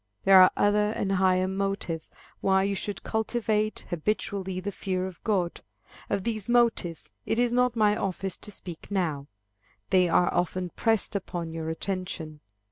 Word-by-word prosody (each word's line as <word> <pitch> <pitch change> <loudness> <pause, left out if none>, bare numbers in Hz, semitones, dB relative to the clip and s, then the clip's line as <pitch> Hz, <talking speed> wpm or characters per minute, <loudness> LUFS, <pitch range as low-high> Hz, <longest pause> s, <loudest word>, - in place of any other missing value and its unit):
There 195 -1 +8
are 185 - +8
other 210 0 +3
and 195 - -1
higher 185 -1 +3
motives, 190 -4 -3 0.3
why 190 0 +3
you 200 0 0
should 200 +1 -4
cultivate, 220 -1 -1
habitually, 190 +1 -2
the 205 +2 -4
fear 185 -1 -2
of 185 -2 -9
God. 185 -6 0 0.5
Of 195 - 0
these 220 -1 -3
motives, 230 -9 +1 0.2
it 225 - 0
is 240 0 +2
not 250 -1 +2
my 210 -2 +3
office 195 -1 -3
to 210 - -9
speak 175 -4 -9
now. 160 -8 -1 0.6
They 185 -2 +4
are 175 +1 +3
often 180 0 -1
pressed 225 -3 +1
upon 175 -4 -4
your 160 -1 -4
attention. 165 -3 -4
190 Hz, 155 wpm, -27 LUFS, 180-210 Hz, 0.6 s, There